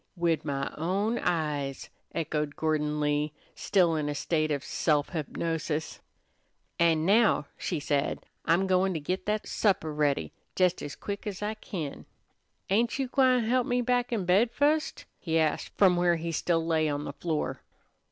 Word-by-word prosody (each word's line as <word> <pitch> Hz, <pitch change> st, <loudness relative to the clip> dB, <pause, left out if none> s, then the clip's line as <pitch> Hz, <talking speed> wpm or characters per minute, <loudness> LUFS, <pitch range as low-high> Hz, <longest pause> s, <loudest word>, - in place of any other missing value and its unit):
"Wid 170 Hz, -2 st, +1 dB
my 140 Hz, -2 st, -3 dB
own 200 Hz, +8 st, 0 dB
eyes," 150 Hz, -5 st, -2 dB, 0.2 s
echoed 150 Hz, -2 st, -2 dB
Gordon 150 Hz, -1 st, 0 dB
Lee, 150 Hz, 0 st, 0 dB, 0.2 s
still 175 Hz, -5 st, +2 dB
in 150 Hz, -1 st, -1 dB
a 145 Hz, -, -2 dB
state 155 Hz, +1 st, 0 dB
of 145 Hz, -3 st, -1 dB
self 150 Hz, -3 st, +1 dB
hypnosis. 160 Hz, -1 st, -3 dB, 0.8 s
"An' 165 Hz, -2 st, +3 dB
now," 210 Hz, -5 st, +4 dB
she 170 Hz, -, -3 dB
said, 145 Hz, -1 st, -1 dB, 0.2 s
"I'm 175 Hz, +4 st, +3 dB
goin' 185 Hz, 0 st, +2 dB
to -, -, -1 dB
git 180 Hz, +7 st, -3 dB
that 210 Hz, 0 st, 0 dB
supper 185 Hz, -7 st, +1 dB
ready 150 Hz, -2 st, 0 dB, 0.2 s
jes 180 Hz, -1 st, +2 dB
as 145 Hz, -, -6 dB
quick 200 Hz, +1 st, -6 dB
ez 205 Hz, -1 st, -4 dB
I 210 Hz, +1 st, -1 dB
kin." 170 Hz, -9 st, -6 dB, 0.6 s
"Ain't 230 Hz, +6 st, +2 dB
you 270 Hz, -2 st, -2 dB
gwine 255 Hz, -2 st, +4 dB
help 245 Hz, +2 st, +1 dB
me 245 Hz, 0 st, +1 dB
back 245 Hz, 0 st, +1 dB
in 215 Hz, -6 st, -1 dB
bed 195 Hz, +7 st, +4 dB
fust?" 295 Hz, +5 st, 0 dB
he 165 Hz, -2 st, 0 dB
asked 155 Hz, -1 st, +1 dB
from 190 Hz, -3 st, +5 dB
where 175 Hz, 0 st, +3 dB
he 165 Hz, 0 st, -3 dB
still 165 Hz, 0 st, 0 dB
lay 160 Hz, -2 st, +2 dB
on 145 Hz, 0 st, -2 dB
the 140 Hz, -, -5 dB
floor. 160 Hz, 0 st, -2 dB
170 Hz, 165 wpm, -28 LUFS, 150-200 Hz, 0.8 s, from